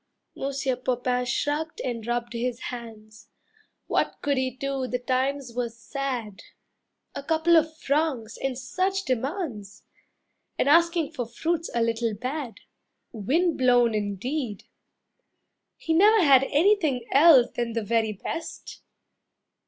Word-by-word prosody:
Monsieur 270 Hz, -1 st, -2 dB
Popain 250 Hz, 0 st, -1 dB
shrugged 295 Hz, +5 st, -2 dB
and 235 Hz, -3 st, -4 dB
rubbed 240 Hz, 0 st, -2 dB
his 235 Hz, 0 st, -2 dB
hands. 220 Hz, -2 st, -11 dB, 0.6 s
What -, -, 0 dB
could 285 Hz, -1 st, +1 dB
he 260 Hz, -1 st, 0 dB
do, 265 Hz, +1 st, -3 dB
the 250 Hz, -, -1 dB
times 260 Hz, +1 st, -1 dB
were 245 Hz, -1 st, -1 dB
sad. 235 Hz, -2 st, -5 dB, 0.7 s
A -, -, -5 dB
couple 320 Hz, +3 st, +2 dB
of 315 Hz, -1 st, +2 dB
francs 280 Hz, -7 st, -1 dB
and 270 Hz, -2 st, -3 dB
such 375 Hz, +9 st, -1 dB
demands! 255 Hz, -, -3 dB, 0.7 s
And -, -, +1 dB
asking 335 Hz, 0 st, +3 dB
for 250 Hz, -8 st, -4 dB
fruits 325 Hz, +7 st, -2 dB
a 235 Hz, -, +2 dB
little 230 Hz, -1 st, -1 dB
bad. 255 Hz, +2 st, -5 dB, 0.5 s
Wind 300 Hz, -, 0 dB
blown 245 Hz, -2 st, +4 dB
indeed! 210 Hz, +3 st, -3 dB, 1.1 s
He 325 Hz, -, -2 dB
never 415 Hz, +4 st, +5 dB
had 270 Hz, -3 st, +6 dB
Anything 300 Hz, -, +2 dB
else 275 Hz, -4 st, +6 dB
than 235 Hz, -1 st, -2 dB
the 230 Hz, -1 st, -2 dB
very 220 Hz, 0 st, 0 dB
best. 320 Hz, -, -7 dB
255 Hz, 125 wpm, -26 LUFS, 235-310 Hz, 1.1 s, had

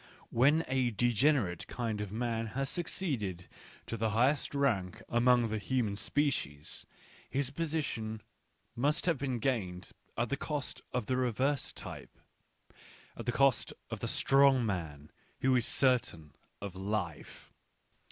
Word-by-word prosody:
When 145 Hz, +7 st, +4 dB
a 130 Hz, -1 st, +2 dB
degenerate 120 Hz, -, +2 dB
kind 115 Hz, -4 st, -2 dB
of 105 Hz, -2 st, -4 dB
man 115 Hz, 0 st, -1 dB
has 135 Hz, -1 st, -1 dB
succeeded 125 Hz, -, -3 dB, 0.4 s
to 115 Hz, -, -4 dB
the 110 Hz, 0 st, +1 dB
highest 130 Hz, +7 st, +2 dB
rank 105 Hz, -11 st, +1 dB
among 120 Hz, 0 st, +4 dB
the 110 Hz, 0 st, -1 dB
human 115 Hz, -2 st, 0 dB
species, 100 Hz, -, -2 dB, 0.4 s
his 135 Hz, -1 st, -1 dB
position 140 Hz, -9 st, -2 dB, 0.5 s
must 145 Hz, +7 st, +1 dB
have 165 Hz, -6 st, +2 dB
been 130 Hz, -3 st, -1 dB
gained 105 Hz, -8 st, -2 dB, 0.3 s
at 120 Hz, 0 st, 0 dB
the 140 Hz, -, 0 dB
cost 145 Hz, -2 st, -4 dB
of 125 Hz, -, -1 dB
the 130 Hz, -, 0 dB
reverse 130 Hz, +3 st, +1 dB
type -, -, -9 dB, 0.5 s
— -, -, -22 dB
at -, -, -8 dB
the -, -, +3 dB
cost 135 Hz, 0 st, +3 dB, 0.2 s
of -, -, -3 dB
the -, -, -3 dB
strong 135 Hz, -2 st, +4 dB
man 80 Hz, -8 st, -4 dB, 0.3 s
who 130 Hz, 0 st, +4 dB
is 120 Hz, -2 st, +3 dB
certain 115 Hz, -, +1 dB, 0.3 s
of 100 Hz, -2 st, -5 dB
life. 95 Hz, -4 st, -4 dB
120 Hz, 140 wpm, -32 LUFS, 105-135 Hz, 0.5 s, When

